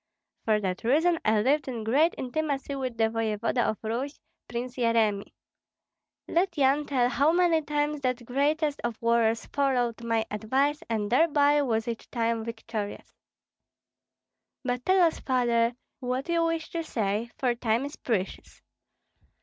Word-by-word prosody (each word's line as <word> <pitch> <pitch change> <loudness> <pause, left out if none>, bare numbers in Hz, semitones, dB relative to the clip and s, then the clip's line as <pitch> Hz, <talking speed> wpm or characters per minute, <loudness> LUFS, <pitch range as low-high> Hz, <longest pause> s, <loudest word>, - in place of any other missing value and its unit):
For 215 -1 +3
that 185 -2 -3
reason 325 +8 +3
I 215 -1 +3
lived 280 +3 +2
in 240 -4 -4
great 285 +10 +3
intimacy 280 +1 -2
with 260 -4 -4
the 225 - +2
voevoda 225 +2 0
of 215 - -2
Rus, 245 +6 -3 0.3
Prince 245 +1 -5
Yeremi. 225 -4 +1 1.0
Let 345 0 0
Yan 280 +1 +3
tell 255 -4 +2
how 280 +4 +3
many 340 -2 +3
times 295 0 -1
that 250 -2 -1
greatest 290 +4 0
of 235 -2 -3
warriors 230 -1 +2
followed 245 -4 0
my 230 -1 0
advice, 270 +8 0
and 215 -2 -1
thereby 290 +1 +4
was 225 -4 0
each 230 -1 -5
time 230 -1 -1
victorious." 225 -2 -6 1.5
"But 250 -1 -2
tell 375 -1 +5
us, 325 - 0
Father, 240 -2 +1 0.2
what 255 +1 -2
you 335 -1 +2
wish 330 -1 -2
to 335 - -2
say, 220 -6 -2
for 250 -2 +1
time 235 +1 0
is 285 - -7
precious." 200 -6 -4
250 Hz, 145 wpm, -27 LUFS, 230-290 Hz, 1.5 s, tell